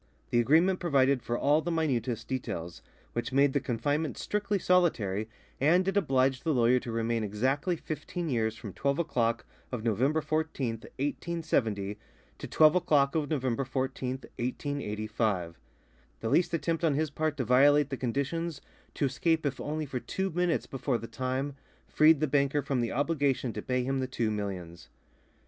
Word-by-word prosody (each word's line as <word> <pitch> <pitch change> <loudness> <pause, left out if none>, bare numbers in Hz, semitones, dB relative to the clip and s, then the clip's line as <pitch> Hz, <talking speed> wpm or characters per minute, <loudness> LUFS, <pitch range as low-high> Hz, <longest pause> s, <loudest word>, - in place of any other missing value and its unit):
The 120 - +3
agreement 165 +10 +4
provided 140 -6 +2
for 120 +1 -2
all 145 +3 +3
the 175 - -3
minutest 125 -8 -1
details, 85 -10 -4 0.3
which 120 +3 -3
made 140 +1 +4
the 140 - +2
confinement 140 +4 -1
strictly 205 0 -1
solitary, 115 - +1 0.3
and 175 +7 +3
it 195 - 0
obliged 135 -8 +2
the 160 -3 +1
lawyer 125 +1 +4
to 120 - -6
remain 115 0 0
exactly 130 - 0
fifteen 165 +2 -5
years 110 -5 0
from 105 -5 -8
twelve 140 +1 0
o'clock 115 -8 0 0.3
of 125 -4 -4
November 125 +8 +2
14th, 150 -8 -2
1870, 130 -9 -1 0.4
to - - -6
twelve 155 -1 +5
o'clock 145 -6 +3
of 155 -3 -1
November 130 -4 0
14th, 130 0 -3 0.2
1885. 110 - -2 0.6
The 115 - -2
least 170 +7 +3
attempt 165 0 -1
on 155 -4 +3
his 155 0 0
part 155 0 -1
to 130 - -1
violate 145 +4 +5
the - - 0
conditions, 140 +6 -2 0.4
to - - +1
escape 160 +4 +1
if 140 -2 -2
only 155 +1 -3
for 130 -2 -4
two 190 +8 -3
minutes 175 0 0
before 130 -1 -2
the 115 - -7
time 130 +4 -3 0.3
freed 155 -1 +5
the - - +4
banker 140 +1 +1
from 130 -3 0
the 120 - -1
obligation 140 -4 0
to 105 - -4
pay 125 +2 -1
him 135 +1 -1
the 130 - -1
two 115 -4 -1
millions. 95 -5 -5
135 Hz, 165 wpm, -29 LUFS, 120-155 Hz, 0.6 s, twelve